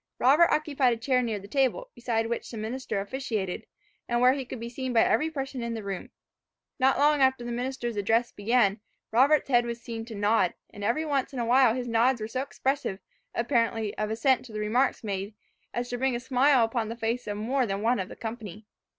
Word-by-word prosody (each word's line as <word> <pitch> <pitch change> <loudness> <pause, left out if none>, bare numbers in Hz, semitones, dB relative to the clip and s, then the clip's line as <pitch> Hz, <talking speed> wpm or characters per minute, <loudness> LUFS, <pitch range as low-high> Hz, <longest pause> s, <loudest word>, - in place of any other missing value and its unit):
Robert 295 +7 +5
occupied 285 -5 +2
a - - -4
chair 250 +2 +1
near 225 -3 -2
the 200 0 -10
table, 275 - 0
beside 230 -2 -1
which 235 +1 -3
the 230 - -7
minister 220 0 -3
officiated, 205 -3 -3 0.4
and 240 0 +1
where 250 +1 +6
he 270 -1 -4
could 250 0 -7
be 230 - -5
seen 255 +1 -4
by 225 - +5
every 315 - +2
person 270 -4 -4
in 235 0 -3
the 220 - -5
room: 195 -2 -5 0.7
Not 265 0 +4
long 295 0 +4
after 260 -2 +3
the 240 - -4
minister's 245 -1 -3
address 225 +4 +1
began, 210 -1 +2 0.3
Robert's 275 +7 +4
head 240 -3 +4
was 235 0 -4
seen 230 -1 -6
to 225 -2 -8
nod; 205 -2 +2 0.2
and 205 - -9
every 240 +10 0
once 280 -2 -1
in - - -6
a 235 - 0
while 245 -1 +5
his 250 -1 -3
nods 235 +2 +2
were 215 - -4
so 255 +3 -2
expressive, 270 -6 -2 0.4
apparently, 230 -3 0
of 215 0 -2
assent 240 +4 +2
to 240 - -12
the 215 - -5
remarks 240 +6 +1
made, 200 0 -4 0.4
as 240 0 -3
to 245 - -3
bring 265 -1 +1
a - - -2
smile 260 0 +3
upon 225 -1 -2
the 230 - -4
face 230 +1 -2
of 205 0 -3
more 250 +4 0
than 200 +1 -3
one 240 +1 +2
of 190 +1 -3
the - - -9
company. 220 -3 -7
240 Hz, 220 wpm, -27 LUFS, 220-260 Hz, 0.7 s, where